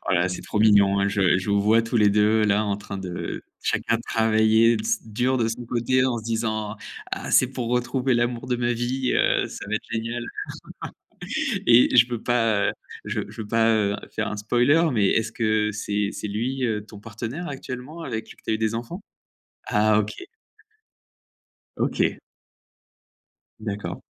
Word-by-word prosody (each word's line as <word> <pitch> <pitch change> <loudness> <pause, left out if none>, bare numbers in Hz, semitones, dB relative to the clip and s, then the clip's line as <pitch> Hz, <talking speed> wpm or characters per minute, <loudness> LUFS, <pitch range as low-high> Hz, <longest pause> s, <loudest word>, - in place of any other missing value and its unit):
Oh - - +1
là 90 - +3
là, 90 - +1
c'est 90 - -5
trop 105 - -3
mignon, 100 -2 +4
je 95 -3 +2
je 95 - -6
vous 100 0 +3
vois 110 +3 +4
tous 115 +1 -2
les 105 -2 +5
2, 105 +1 +3
là, 105 +1 +2
en 100 -1 0
train 100 -1 -7
de 90 -2 -5 0.2
chacun 115 - 0
travailler 110 0 +3
s 225 -3 -1
dur 125 +4 0
de 115 -2 +1
son 115 +2 -5
côté 120 +2 +1
en 125 -2 0
se 110 - -10
disant: 110 -2 -2 0.4
«Ah, - - -4
c'est 130 - +5
pour 125 -3 -4
retrouver 125 +2 0
l'amour 120 +1 -1
de 125 -1 0
ma 120 0 0
vie, 125 +2 -1
heu, - - +2
ça - - -8
va 110 - -1
être 110 - -2
génial» 115 +1 -3 1.4
et 120 +1 +6
je 120 0 +7
veux 120 -2 -3
pas, 115 -4 +2
heu, - - -6 0.3
je - - -2
veux - - -7
je - - -7
veux - - -9
pas, 115 0 +3
heu, 105 -2 +1 0.2
faire 110 0 -1
un 105 - -4
spoiler, 120 +9 +3
mais 105 -5 +2
est-ce 110 0 +1
que 110 -2 +1
c'est 105 0 -2
c'est - - -5
lui, 125 +6 -2
heu, 105 -3 -1
ton 105 -1 -12
partenaire 115 - -6
actuellement 135 +3 -7
avec 110 -7 -4
qui - - -13
tu - - -6
as - - +2
eu - - -2
des 110 0 0
enfants? 120 - -5 0.7
Ah 105 0 +3
OK. 105 0 -1 1.7
OK. - - 0 1.4
D'accord. 105 -1 -5
110 Hz, 185 wpm, -24 LUFS, 105-120 Hz, 1.7 s, je